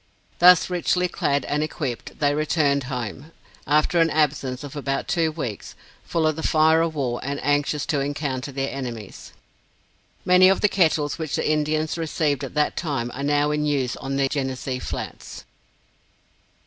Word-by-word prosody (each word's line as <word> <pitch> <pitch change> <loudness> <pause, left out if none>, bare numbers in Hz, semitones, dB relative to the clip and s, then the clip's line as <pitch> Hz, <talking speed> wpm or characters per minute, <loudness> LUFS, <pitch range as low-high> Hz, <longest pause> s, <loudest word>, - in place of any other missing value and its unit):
Thus 180 0 +7
richly 180 0 0
clad 140 -5 -1
and 145 +1 -1
equipped, 145 -5 -4
they 145 -1 +2
returned 145 -2 +1
home, 125 +3 -5 0.4
after 150 +4 +3
an 165 0 +4
absence 140 -4 0
of 145 0 -8
about 135 -1 -2
two 165 -3 +1
weeks, 125 -10 -6 0.3
full 165 -2 0
of 155 -1 +2
the 160 - -5
fire 160 +1 +4
of 165 -1 -1
war, 125 -4 -1
and 140 +1 -3
anxious 145 +1 +1
to 155 -4 0
encounter 140 -1 -3
their 135 0 -3
enemies. 120 -6 -7 0.9
Many 180 +1 +6
of 195 - +2
the 210 - +4
kettles 160 -5 +1
which 160 -3 -2
the - - -1
Indians 155 +1 0
received 150 -3 -1
at - - -7
that 150 0 +1
time 140 -8 -2
are 135 - -6
now 145 +1 +1
in 150 0 0
use 135 -4 0
on 135 0 -4
the 135 0 +2
Genesee 130 -2 -3
Flats. - - -7
145 Hz, 165 wpm, -23 LUFS, 135-160 Hz, 0.9 s, Thus